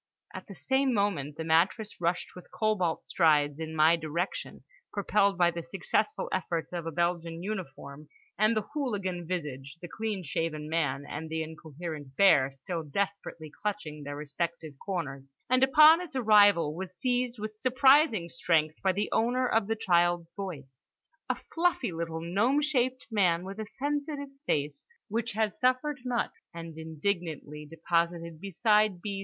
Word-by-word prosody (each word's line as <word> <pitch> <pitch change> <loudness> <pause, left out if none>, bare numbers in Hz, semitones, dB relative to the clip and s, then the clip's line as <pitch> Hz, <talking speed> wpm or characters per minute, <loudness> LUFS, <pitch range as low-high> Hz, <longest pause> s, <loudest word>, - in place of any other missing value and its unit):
—at - - -8
the 195 - -10
same 265 +4 +1
moment 170 -9 -1
the 160 - -3
mattress 175 +6 +1
rushed 170 +1 -1
with 180 - -12
cobalt 205 -7 0
strides 150 -3 +3
in 160 0 -5
my 160 +2 +6
direction, 165 +3 -4 0.3
propelled 200 -1 +2
by 175 -1 +4
the 170 0 -5
successful 195 +5 -1
efforts 170 -2 -2
of 170 -2 -4
the 165 - -3
Belgian 170 0 -1
uniform 150 -7 -6 0.3
and 215 +2 +3
the 215 - 0
hooligan 200 - -2
visage, 150 -5 -5
the 175 - -8
clean 210 0 -3
shaven 155 -1 -3
man 145 -4 -1
and 160 +2 -6
the 160 0 -2
incoherent 155 -2 -8
bear 145 -8 +5
still 165 +6 -5
desperately 165 -1 -4
clutching 190 -8 -3
their 145 0 -6
respective 155 +1 -4
corners; 140 -8 -4 0.2
and 255 0 +4
upon 305 +5 +7
its 350 -6 -8
arrival 205 - +5
was 185 0 -7
seized 250 -1 0
with 215 0 -6
surprising 260 - +4
strength 160 -2 0
by 190 - +3
the 205 +3 -1
owner 250 +3 +2
of 225 -3 +1
the 225 - 0
child's 175 -4 +2
voice—a 180 - -8 0.2
fluffy 330 - +1
little 165 -1 -4
gnome 205 - +2
shaped 260 -4 0
man 180 -5 +2
with 195 +3 -7
a 215 - -4
sensitive 285 +2 -3 0.2
face 145 -1 -1 0.2
which 230 +2 -2
had 215 -2 0
suffered 255 +3 +1
much—and 170 -9 -4
indignantly 160 -2 -4
deposited 170 0 -1
beside 210 0 +2
B. 200 +1 -4
175 Hz, 150 wpm, -29 LUFS, 160-215 Hz, 0.3 s, upon